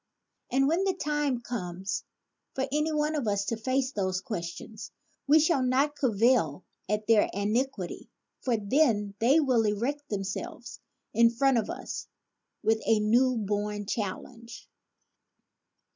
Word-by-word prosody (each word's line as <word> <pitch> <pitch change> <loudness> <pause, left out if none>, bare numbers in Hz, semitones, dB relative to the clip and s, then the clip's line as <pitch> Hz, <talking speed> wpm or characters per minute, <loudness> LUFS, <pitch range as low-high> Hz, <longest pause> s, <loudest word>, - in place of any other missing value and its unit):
And 270 +1 +3
when 335 +6 +2
the 385 -2 +1
time 295 -6 -1
comes 190 -5 -4 0.5
for 265 - -1
any 300 +2 +1
one 300 0 0
of 285 -7 -2
us 200 -1 0
to 230 - -1
face 260 +4 -1
those 185 -5 -1
questions 195 +2 -6 0.4
we 300 +3 +6
shall 310 -3 +3
not 265 +4 +2
cavil 225 - +2 0.3
at 210 0 0
their 220 -2 +4
antiquity, 210 -1 -2 0.3
for 245 -3 0
then 210 -2 +2
they 265 +8 +5
will 255 -6 +3
erect 245 +8 -2
themselves 195 -2 -5 0.3
in 235 0 +6
front 255 +1 +2
of 215 - -4
us - - -6 0.6
with 220 0 +2
a 225 -1 +4
new 240 +4 +3
bora 205 0 -2
challenge. 230 +3 -5
235 Hz, 135 wpm, -28 LUFS, 205-270 Hz, 0.6 s, we